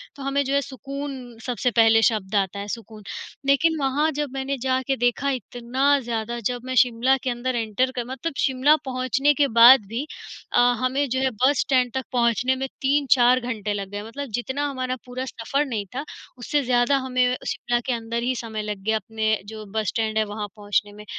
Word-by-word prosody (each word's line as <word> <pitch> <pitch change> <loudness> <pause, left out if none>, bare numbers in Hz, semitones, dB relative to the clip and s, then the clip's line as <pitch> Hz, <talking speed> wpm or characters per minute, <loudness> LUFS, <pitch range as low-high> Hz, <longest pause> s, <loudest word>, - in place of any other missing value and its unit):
तो 275 - -9
हमें 280 +1 +1
जो 270 - -1
है 280 - +3
सुकून 270 -2 -7
सबसे 250 -1 0
पहले 225 0 +5
शब्द 210 -3 -4
आता 200 0 0
है, 200 - -5
सुकून। 220 -1 -7 0.4
लेकिन 315 +4 +3
वहाँ 285 +3 +1
जब 295 0 -3
मैंने 270 +1 -2
जाके 260 +1 0
देखा, 245 +3 +1
इतना 260 +3 0
ज़्यादा 235 -1 -3
जब 245 +1 -1
मैं 255 0 -3
शिमला 250 +1 +2
के 260 - -1
अंदर 245 +1 -2
एंटर 230 +3 0
कर 245 -2 -2
मतलब 265 +6 -4
शिमला 265 +3 +4
पहुँचने 260 +2 +1
के 285 -1 +2
बाद 245 -2 +9
भी 235 +7 -3 0.5
अ, - - +4 0.2
हमें 260 +3 0
जो 260 +2 0
है 265 0 +2
बस 255 +5 +2
स्टैंड 255 -3 +2
तक 265 - -2
पहुँचने 245 +1 +2
में 265 +1 -3
3-4 265 -3 +4
घंटे 220 -4 -3
लग 200 -1 -4
गए। 205 0 -4
मतलब 270 +5 -7
जितना 265 +4 -2
हमारा 255 -2 -3
पूरा 255 +1 -5
सफर 265 +4 -2
नहीं 225 -7 -3
था, 275 - -2 0.3
उससे 285 +4 0
ज़्यादा 245 +2 +3
हमें 255 -1 +1
शिमला 240 0 -1
के 255 - 0
अंदर 230 0 -3
ही 255 +1 0
समय 220 -3 -4
लग 210 -1 -4
गया, 220 +2 +1
अपने 220 +1 -1
जो 215 0 -8
बस 215 -2 0
स्टैंड 220 -1 -1
है, 215 - +4
वहाँ 210 0 -5
पहुँचने 205 0 -1
में। 210 0 -12
250 Hz, 200 wpm, -24 LUFS, 225-270 Hz, 0.5 s, बाद